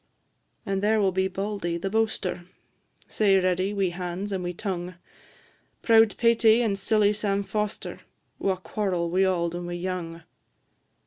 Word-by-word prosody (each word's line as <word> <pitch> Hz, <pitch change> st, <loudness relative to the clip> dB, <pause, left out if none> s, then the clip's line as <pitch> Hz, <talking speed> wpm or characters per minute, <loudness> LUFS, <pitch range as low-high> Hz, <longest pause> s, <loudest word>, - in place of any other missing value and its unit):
And 195 Hz, -2 st, -1 dB
there 215 Hz, +2 st, +3 dB
will 195 Hz, -2 st, +2 dB
be 190 Hz, +1 st, +1 dB
Bauldy, 195 Hz, -3 st, -3 dB
the 170 Hz, -, -4 dB
boaster, 220 Hz, -5 st, -1 dB, 0.6 s
Sae 200 Hz, -3 st, +3 dB
ready 185 Hz, +1 st, +1 dB
wi' 195 Hz, -3 st, 0 dB
hands 180 Hz, +3 st, -5 dB
and 190 Hz, -2 st, -2 dB
wi' 175 Hz, -, -2 dB
tongue; 180 Hz, -1 st, -4 dB, 0.9 s
Proud 225 Hz, -2 st, +5 dB
Paty 230 Hz, 0 st, +4 dB
and 200 Hz, -3 st, -1 dB
silly 210 Hz, 0 st, +3 dB
Sam 200 Hz, -1 st, -1 dB
Foster, 210 Hz, 0 st, -4 dB, 0.4 s
Wha 195 Hz, -1 st, +1 dB
quarrel 185 Hz, -3 st, -2 dB
wi' 190 Hz, +2 st, +3 dB
auld 170 Hz, -3 st, 0 dB
and 175 Hz, 0 st, -5 dB
wi' 175 Hz, -, -4 dB
young. 175 Hz, -2 st, -4 dB
195 Hz, 145 wpm, -26 LUFS, 180-210 Hz, 0.9 s, Proud